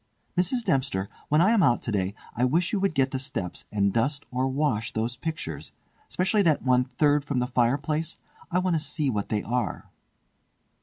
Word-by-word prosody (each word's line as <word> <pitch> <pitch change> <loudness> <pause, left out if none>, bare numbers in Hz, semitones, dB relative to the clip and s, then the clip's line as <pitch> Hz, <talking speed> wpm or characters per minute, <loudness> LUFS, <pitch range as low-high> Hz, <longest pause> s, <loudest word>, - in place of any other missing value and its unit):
"Mrs. 185 +8 +1
Dempster, 130 -8 0 0.2
when 150 +2 +4
I 195 +5 +5
am 230 -3 +4
out 130 -8 +3
to 115 - -2
day 100 -1 -1 0.2
I 120 - 0
wish 170 - +2
you 205 - +2
would 195 -4 0
get 135 -1 +2
the 130 - -2
steps 90 -9 -4
and 100 -2 +1
dust 140 +5 0
or 130 +1 0
wash 130 -5 0
those 115 +3 -1
pictures—specially 160 - -3
that 160 -6 +2
one 125 -1 +4
the - - -23
third 145 0 +2
from 140 -2 -2
the 125 - +2
fireplace—I 145 +8 -1
want 185 -1 +1
to - - +2
see 150 -2 -1
what 105 -3 -2
they 105 -1 0
are." 120 -1 -2
135 Hz, 190 wpm, -26 LUFS, 115-160 Hz, 0.2 s, I